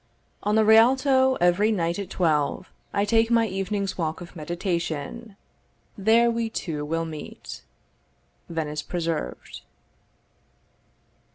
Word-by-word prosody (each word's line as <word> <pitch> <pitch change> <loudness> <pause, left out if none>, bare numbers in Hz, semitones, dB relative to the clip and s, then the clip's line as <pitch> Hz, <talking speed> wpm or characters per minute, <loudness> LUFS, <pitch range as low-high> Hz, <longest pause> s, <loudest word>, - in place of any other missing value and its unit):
On 210 +1 0
the 220 0 +4
Rialto, 260 +4 +5
every 180 +4 +3
night 170 -3 -1
at 200 - -5
twelve, 155 0 0 0.2
I 200 - +1
take 225 +1 +3
my 230 -1 +4
evening's 195 0 -3
walk 160 -1 -2
of 175 0 -11
meditation: 170 +5 -4 0.6
There 225 +4 +4
we 230 -1 -1
two 160 -8 -4
will 165 +2 -2
meet. 155 -2 -8 0.9
Venice 155 -2 -3
Preserved. 165 - -4
190 Hz, 110 wpm, -25 LUFS, 165-225 Hz, 0.9 s, Rialto